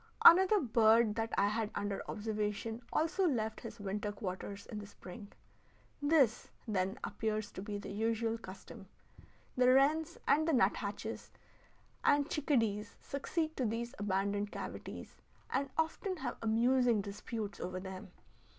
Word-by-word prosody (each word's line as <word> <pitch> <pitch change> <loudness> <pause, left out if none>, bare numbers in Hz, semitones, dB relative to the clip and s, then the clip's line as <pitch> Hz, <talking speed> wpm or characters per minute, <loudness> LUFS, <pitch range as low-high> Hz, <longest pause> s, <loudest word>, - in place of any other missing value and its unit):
Another 380 +4 +9
bird 225 - +4
that 225 +1 -2
I - - +4
had 215 0 -1
under 205 -1 -2
observation 215 +1 -2
also 355 +4 +2
left 220 -7 -1
his - - -8
winter 205 +1 -2
quarters 200 0 -5
in 215 - -6
the 205 - -8
spring. 200 +1 -11 0.7
This, 285 -6 +3 0.2
then, 195 +1 0
appears 215 -1 -2
to - - -7
be 205 0 -4
the 200 - -7
usual 225 +2 0
custom. 190 -1 -10 0.7
The 250 0 +5
wrens 305 +5 +3
and 310 +3 +4
the 325 - +3
nut 205 -6 +4
hatches 210 +2 -5 0.7
and 285 0 +4
chickadees 230 -9 0
succeed 315 +3 -2
to 255 - +1
these 235 +3 -3
abandoned 200 +1 0
cavities, - - -7 0.3
and 275 +2 0
often 340 +4 -1
have 255 -5 -4
amusing 235 0 +3
disputes 205 +1 -5
over 185 0 -4
them. 190 -1 -8
225 Hz, 140 wpm, -34 LUFS, 205-265 Hz, 0.7 s, Another